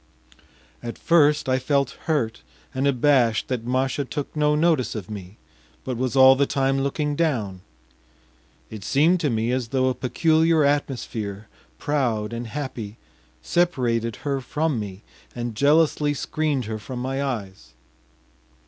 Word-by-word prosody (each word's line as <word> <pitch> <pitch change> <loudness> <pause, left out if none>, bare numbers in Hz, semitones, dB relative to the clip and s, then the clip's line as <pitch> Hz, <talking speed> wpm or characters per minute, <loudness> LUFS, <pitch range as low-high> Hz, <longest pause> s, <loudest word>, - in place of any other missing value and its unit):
At 115 - -6
first 150 -4 +3
I 130 0 +2
felt 140 +1 +1
hurt 140 -9 -1 0.3
and 135 +1 0
abashed 125 -4 +2
that 120 -3 -3
Masha 130 +3 0
took 145 +2 -5
no 150 0 +2
notice 150 -7 +2
of 105 -2 -6
me, 100 0 -8 0.5
but 130 - -3
was 130 +2 -2
all 130 0 +8
the 140 +1 +2
time 135 0 +1
looking 145 +2 -1
down; 115 - -1 1.1
it 110 -3 -8
seemed 155 - +3
to 155 -4 0
me 115 0 0
as 125 -2 -1
though 130 +1 +1
a - - 0
peculiar 160 +5 +2
atmosphere, 115 -8 -2 0.3
proud 120 -8 -1
and 115 0 -4
happy, 115 -5 -6 0.5
separated 120 - 0
her 140 -2 -1
from 150 0 -1
me 100 -1 -7 0.3
and 120 -1 -4
jealously 145 +3 +3
screened 150 -4 -1
her 110 0 -4
from 125 +4 -7
my 135 +2 -2
eyes. 95 - -5
130 Hz, 140 wpm, -24 LUFS, 115-145 Hz, 1.1 s, all